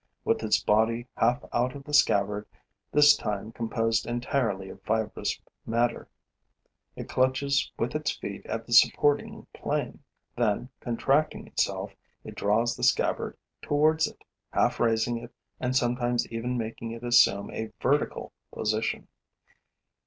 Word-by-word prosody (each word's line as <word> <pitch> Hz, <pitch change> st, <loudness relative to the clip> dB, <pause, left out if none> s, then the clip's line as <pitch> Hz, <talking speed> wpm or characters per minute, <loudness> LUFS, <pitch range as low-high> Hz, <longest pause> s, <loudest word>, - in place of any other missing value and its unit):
With -, -, +1 dB
its 110 Hz, -1 st, +2 dB
body 115 Hz, +3 st, +2 dB
half 120 Hz, +2 st, +2 dB
out 125 Hz, +2 st, 0 dB
of 140 Hz, -, -9 dB
the 150 Hz, -, -9 dB
scabbard, 105 Hz, -8 st, +3 dB, 0.4 s
this 145 Hz, 0 st, +7 dB
time 105 Hz, +1 st, -4 dB
composed 115 Hz, 0 st, -1 dB
entirely 120 Hz, -5 st, -1 dB
of 95 Hz, -, -11 dB
fibrous 110 Hz, +1 st, -1 dB, 0.2 s
matter, 120 Hz, +1 st, -1 dB, 0.9 s
it -, -, -7 dB
clutches 140 Hz, +2 st, +1 dB
with 115 Hz, -, -1 dB
its 155 Hz, 0 st, -1 dB
feet 100 Hz, -1 st, -6 dB
at 115 Hz, 0 st, -4 dB
the 120 Hz, -, -4 dB
supporting 145 Hz, +4 st, +3 dB
plane. -, -, -3 dB, 0.4 s
Then, 120 Hz, +1 st, 0 dB
contracting 135 Hz, +5 st, 0 dB
itself, -, -, -1 dB, 0.3 s
it -, -, -9 dB
draws 115 Hz, +4 st, +1 dB
the -, -, -7 dB
scabbard -, -, +1 dB, 0.2 s
towards 155 Hz, +2 st, +2 dB
it, -, -, -13 dB, 0.3 s
half -, -, +1 dB
raising 115 Hz, 0 st, +1 dB
it 115 Hz, 0 st, -12 dB, 0.2 s
and 125 Hz, 0 st, -1 dB
sometimes 120 Hz, -1 st, +1 dB
even 120 Hz, +2 st, -2 dB
making 115 Hz, 0 st, -4 dB
it 115 Hz, +1 st, -9 dB
assume 120 Hz, -4 st, +4 dB
a 110 Hz, -1 st, -5 dB
vertical 145 Hz, +3 st, 0 dB, 0.2 s
position. 110 Hz, 0 st, -2 dB
120 Hz, 135 wpm, -27 LUFS, 110-130 Hz, 0.9 s, this